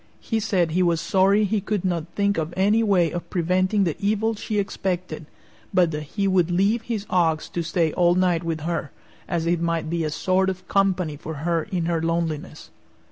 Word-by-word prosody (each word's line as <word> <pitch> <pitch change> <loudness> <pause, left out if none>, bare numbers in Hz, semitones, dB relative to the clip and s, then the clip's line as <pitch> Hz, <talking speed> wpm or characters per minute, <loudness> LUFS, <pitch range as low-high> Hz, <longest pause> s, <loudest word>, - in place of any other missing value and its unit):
He 225 - -2
said 185 -6 +1
he 180 +3 +1
was 170 -2 +2
sorry 195 +3 +3
he 210 0 0
could 205 -1 -2
not 170 -3 -1
think 200 -2 +1
of 160 +2 -4
any 205 +4 +3
way 185 -7 +2
of 175 - -5
preventing 185 +3 +1
the 165 -5 0
evil 215 +2 +1
she 215 0 -4
expected, 180 -5 -3 0.5
but 175 -3 +4
that 150 -1 -3 0.2
he 200 -1 +2
would 180 -3 +2
leave 200 +6 +2
his 225 -3 -4
ox 165 -4 +1
to 170 - -3
stay 165 -1 0
all 175 -1 +3
night 180 -2 +2
with 165 -2 -3
her, 165 -1 -2 0.4
as 170 -1 -1
it 170 0 +1
might 165 -1 -1
be 170 -1 0
a 155 - -1
sort 185 +5 +1
of 185 -1 -6
company 185 -6 +1
for 160 +2 -7
her 170 -1 +1
in 180 -5 -2
her 165 -1 0
loneliness. 165 -1 -3
180 Hz, 200 wpm, -23 LUFS, 165-195 Hz, 0.5 s, but